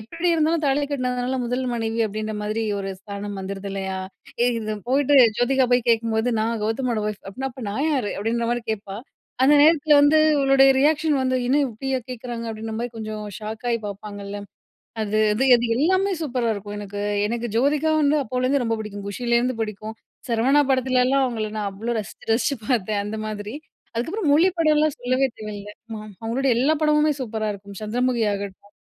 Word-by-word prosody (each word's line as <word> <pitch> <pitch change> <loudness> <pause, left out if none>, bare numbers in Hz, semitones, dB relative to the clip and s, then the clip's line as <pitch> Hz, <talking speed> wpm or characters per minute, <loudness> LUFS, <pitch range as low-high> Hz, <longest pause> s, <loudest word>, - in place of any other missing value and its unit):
எப்படி 330 +11 -3
இருந்தாலும் 320 0 +1
தாலி 280 +1 +2
கட்டினதுனால 250 -1 -1
முதல் 250 +2 -1
மனைவி 225 -1 -2
அப்படின்ற 215 +1 -4
மாதிரி 215 +2 -2 0.2
ஒரு 195 0 -4
ஸ்தானம் 200 0 -6
வந்துடுது 195 +1 -5
இல்லையா. 190 -1 -3 0.4
ஏ - - +4
இது 215 -1 -3
போயிட்டு 280 +2 +3 0.2
ஜோதிகா 260 +2 +3
போய் 245 -1 +2
கேட்கும் 230 -1 +2
போது, 225 +3 +1
"நான் 225 0 -1
கெளதமோட 225 +1 -1
ஒய்ப். 210 -1 -5
அப்டினா 265 +7 -4
அப்ப 250 0 -10
நான் 275 +10 -1
யாரு?" 255 -8 0
அப்படின்ற 230 +3 -1
மாதிரி 240 -1 -1
கேட்பா. 200 -2 -4 0.5
அந்த 290 +3 +6
நேரத்தில 310 -1 +5
வந்து 290 +2 +5 0.2
அவளுடைய 270 0 +5
ரியாக்ஷன் 300 -1 +2
வந்து 255 0 +1
என்ன 275 - +3
இப்படியே 260 +4 -2
கேட்குறாங்க 240 -1 -6
அப்படின்ற 220 0 -5
மாதிரி 240 0 -4
கொஞ்சம் 215 -1 -5 0.2
ஷாக்காயி 220 +2 -3
பாப்பாங்கள்ல, 205 0 -7 0.6
அது 215 0 -1 0.2
அது 250 +6 +1
அது 240 0 0
எல்லாமே 375 +7 +2
சூப்பரா 250 -5 -1
இருக்கும். 205 0 -7
எனக்கு, 205 0 -6 0.3
எனக்கு 235 +2 -2
ஜோதிகா 295 +5 +2
வந்து 290 +1 +3
அப்போலேருந்து 255 +3 0
ரொம்ப 230 -1 0
பிடிக்கும். 205 -2 -7
குஷிலேருந்து 240 +3 0
பிடிக்கும். 215 0 -5 0.3
சரவணா 260 +6 +4
படத்துலலாம் 260 +1 +2
அவங்களை 220 -4 -2
நான் 205 -1 -1
அவ்வளோ 230 +5 -3
ரசிச்சு 215 - -9
ரசிச்சு 240 +5 0
பார்த்தேன் 215 -4 0
அந்த 215 +1 -4
மாதிரி. 210 +1 -5 0.4
அதுக்கப்புறம் 320 - -1
மொழி 330 +6 +5
படலாம் 310 -2 +3
சொல்லவே 255 +2 +1
தேவையில்ல. 210 -1 -7 0.2
ம் 215 -1 -8
அவங்களுடைய 250 +4 0
எல்லா 295 +5 +3
படமுமே 300 0 +3
சூப்பரா 220 -2 -3
இருக்கும். 200 0 -10
சந்திரமுகி 245 +2 0
ஆகட்டும். 200 0 -7
235 Hz, 170 wpm, -23 LUFS, 215-270 Hz, 0.6 s, அந்த